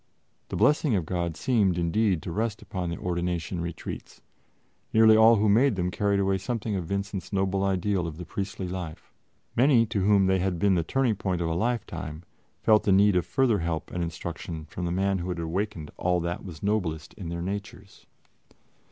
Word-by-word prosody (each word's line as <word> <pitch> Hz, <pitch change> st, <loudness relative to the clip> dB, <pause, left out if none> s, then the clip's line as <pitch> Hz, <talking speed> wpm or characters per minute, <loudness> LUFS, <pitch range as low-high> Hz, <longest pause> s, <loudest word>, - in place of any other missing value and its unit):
The -, -, -4 dB
blessing 150 Hz, -5 st, +3 dB
of 90 Hz, -5 st, 0 dB
God 85 Hz, -2 st, -2 dB
seemed, 105 Hz, -6 st, +2 dB
indeed, 90 Hz, +1 st, +1 dB
to 85 Hz, -, -5 dB
rest 110 Hz, +3 st, -2 dB
upon 90 Hz, -2 st, -4 dB
the 85 Hz, -, -4 dB
ordination 85 Hz, 0 st, -2 dB
retreats; 85 Hz, -1 st, -7 dB, 0.7 s
nearly 110 Hz, 0 st, +6 dB
all 110 Hz, +1 st, +7 dB
who 105 Hz, 0 st, +2 dB
made 115 Hz, +4 st, +4 dB
them 90 Hz, -1 st, -1 dB
carried 100 Hz, +1 st, +1 dB
away 95 Hz, 0 st, +1 dB
something 110 Hz, +1 st, -3 dB
of 90 Hz, -4 st, -3 dB
Vincent's 100 Hz, -1 st, -3 dB
noble 95 Hz, -1 st, 0 dB
ideal 95 Hz, -2 st, 0 dB
of 80 Hz, -2 st, -7 dB
the 90 Hz, -, -7 dB
priestly 95 Hz, +1 st, -4 dB
life. 90 Hz, -3 st, -7 dB, 0.4 s
Many 125 Hz, -2 st, +5 dB
to 110 Hz, -3 st, -2 dB
whom 100 Hz, 0 st, +4 dB
they 95 Hz, 0 st, +2 dB
had 90 Hz, -1 st, 0 dB
been 100 Hz, +3 st, +3 dB
the 85 Hz, -, +2 dB
turning 120 Hz, +3 st, +1 dB
point 95 Hz, -3 st, -1 dB
of 85 Hz, -, -1 dB
a -, -, 0 dB
lifetime, 85 Hz, -6 st, -3 dB, 0.4 s
felt 110 Hz, -1 st, +5 dB
the 100 Hz, -, +1 dB
need 100 Hz, +1 st, +5 dB
of 90 Hz, -1 st, +1 dB
further 110 Hz, +3 st, +2 dB
help 80 Hz, -1 st, -3 dB
and 90 Hz, -, -3 dB
instruction 85 Hz, -1 st, -6 dB
from 90 Hz, +3 st, -5 dB
the 85 Hz, -, -1 dB
man 95 Hz, +1 st, +1 dB
who 90 Hz, +1 st, -4 dB
had 90 Hz, -, -2 dB
awakened 85 Hz, -1 st, -3 dB
all 90 Hz, 0 st, +1 dB
that 85 Hz, +1 st, -3 dB
was 85 Hz, -5 st, -9 dB
noblest 90 Hz, -7 st, -1 dB
in 90 Hz, -5 st, -7 dB
their 85 Hz, 0 st, -4 dB
natures. 100 Hz, +1 st, -7 dB
95 Hz, 195 wpm, -27 LUFS, 85-105 Hz, 0.7 s, all